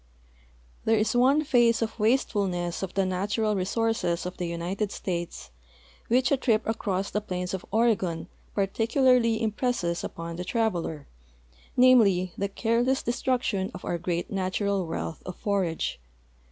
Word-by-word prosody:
There 225 0 +3
is 215 +3 +1
one 270 +5 +4
phase 240 -5 +3
of 225 +1 -5
wastefulness 200 -7 +1
of 190 -2 -5
the 195 -1 +2
natural 205 +4 0
resources 190 -3 0
of 180 - -5
the 175 - -2
United 180 +5 -2
States 175 -4 -4 0.6
which 250 +2 +2
a 280 - +4
trip 225 -4 +2
across 200 -3 -2
the 210 - -1
plains 180 -3 -4
of 190 - -3
Oregon 200 -7 +1 0.3
par 200 - +3
ticularly 230 +2 +3
impresses 215 -6 -1
upon 165 0 -6
the 180 - -3
traveler, 180 -8 -1 0.7
namely, 205 -8 +5
the 200 0 -2
careless 240 +5 +1
de - - 0
struction 240 -7 0
of 185 - -8
our 175 - -2
great 175 0 -2
natural 195 -1 -1
wealth 160 0 -4
of 180 - -7
forage. 185 - -1
200 Hz, 145 wpm, -27 LUFS, 180-230 Hz, 0.7 s, namely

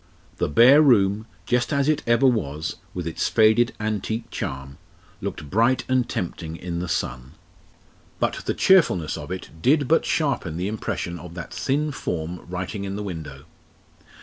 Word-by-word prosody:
The - - 0
bare 125 - +7
room, 110 -6 +3 0.2
just 125 +3 +1
as 140 0 +1
it 155 -1 +2
ever 120 +3 +4
was 80 - 0
with 90 -2 -5
its 85 0 -1
faded 110 +2 +4
antique 110 +2 -3
charm 70 +1 -5 0.4
looked 75 - -5
bright 115 +5 +3
and 130 -2 +1
tempting 80 -2 -4
in 85 0 -5
the 90 - -3
sun. 65 -5 -3 0.9
But - - -1
the - - -1
cheerfulness 125 - +4
of 75 -2 -7
it 95 - -6
did 145 - +3
but 165 - +4
sharpen 135 - -1
the 90 +2 -2
impression 95 -5 -3
of 85 -1 -10
that 85 -4 -7
thin 150 +3 0
form 85 - -4
writing 90 +3 -4
in 100 0 -4
the 105 - -4
window. 75 -7 -7
100 Hz, 160 wpm, -24 LUFS, 85-120 Hz, 0.9 s, bare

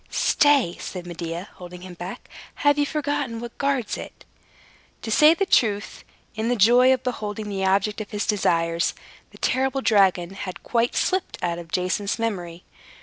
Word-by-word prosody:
"Stay," 280 -12 +3
said 180 -2 -6
Medea, 170 +2 -6
holding 180 0 -10
him 185 0 -9
back. 175 +2 -8 0.4
"Have 290 0 +5
you 290 - +2
forgotten 290 -6 -2
what 235 0 -8
guards 275 -5 0
it?" - - -10 0.8
To 220 - -4
say 305 +8 +6
the 390 - 0
truth, 210 - +1 0.3
in 220 +1 -2
the 245 - +2
joy 245 +4 +6
of 260 -1 +1
beholding 215 -4 -4
the 195 -1 -2
object 200 +3 +1
of 210 - -7
his 210 0 -2
desires, 170 -4 +1 0.3
the - - -16
terrible 265 +1 0
dragon 190 -6 +3
had 190 -1 -7
quite 235 0 0
slipped 375 -1 0
out 170 -1 -1
of 165 -2 -11
Jason's 185 +3 -1
memory. 180 -7 -4
210 Hz, 165 wpm, -24 LUFS, 180-250 Hz, 0.8 s, say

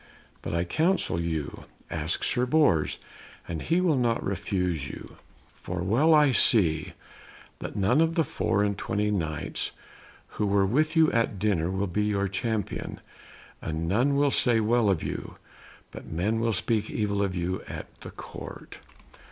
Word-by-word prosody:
But - - -4
I 85 - +1
counsel 160 - +1
you, 80 -4 -4 0.3
ask 80 0 -1
Sir 125 0 +1
Bors, 130 - +3 0.5
and 80 -2 -4
he 170 +2 +1
will 175 -5 +3
not 120 -2 0
refuse 90 -6 -1
you. - - -10 0.4
For 90 -1 -4
well 135 - +4
I 150 -2 +5
see 85 - +3 0.7
that - - -6
none 110 +9 +3
of 165 0 +2
the 165 - +3
four 110 -6 0
and 100 -1 0
twenty 105 +1 -1
Knights 80 -7 -2 0.6
who 105 - -3
were 100 0 +3
with 155 - +1
you 160 -1 +5
at 115 -3 +1
dinner 90 -4 +1
will 95 +1 -1
be 105 +3 -1
your 100 -1 0
champion, 105 +1 -3 0.6
and 80 +1 -3
none 125 +10 +2
will 140 0 +3
say 120 -3 +3
well 110 0 +2
of 95 -5 +1
you, - - -5 0.6
but - - -10
men 100 +8 -1
will 115 0 +1
speak 110 +2 0
evil 100 -2 -1
of 95 -2 -1
you 90 +1 -2
at - - -6 0.2
the - - -8
Court." - - -10
105 Hz, 160 wpm, -27 LUFS, 90-120 Hz, 0.7 s, I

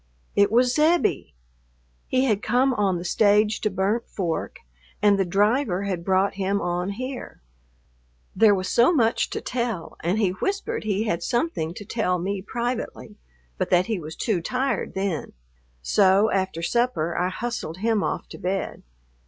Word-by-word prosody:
It 200 0 +4
was 245 +2 +4
Zebbie. 310 - +2 0.7
He 260 +1 +2
had 215 -5 +1
come 255 +4 +2
on 200 -5 +1
the 170 - -6
stage 210 +3 +3
to 215 - +1
Burnt 210 +5 -1
Fork 175 -5 -3 0.4
and 205 -1 +4
the - - +4
driver 205 +2 +1
had 185 -4 -3
brought 190 +2 +2
him 200 +1 -1
on 175 +1 -2
here.... 255 - -7 0.9
There 215 -2 +5
was 185 0 -3
so 240 +7 +4
much 230 -9 +2
to - - -4
tell, 235 -7 -3
and 175 +5 0
he 205 -4 +2
whispered 400 - -3
he 205 0 0
had 170 -6 -1
something 240 - -1
to 205 - -8
tell 190 -4 0
me 190 +2 -3
privately, 240 +4 -4 0.4
but - - -1
that 180 0 +4
he 220 -3 -2
was 160 0 -8
too 210 -8 -1
tired 255 +8 -2
then; 190 -5 -2 0.5
so 200 - +4
after 190 -4 -1
supper 205 -6 0
I 180 +1 +1
hustled 200 -5 -4
him 220 +1 +1
off - - -3
to - - -10
bed.... 190 +2 -3
205 Hz, 160 wpm, -24 LUFS, 185-240 Hz, 0.9 s, There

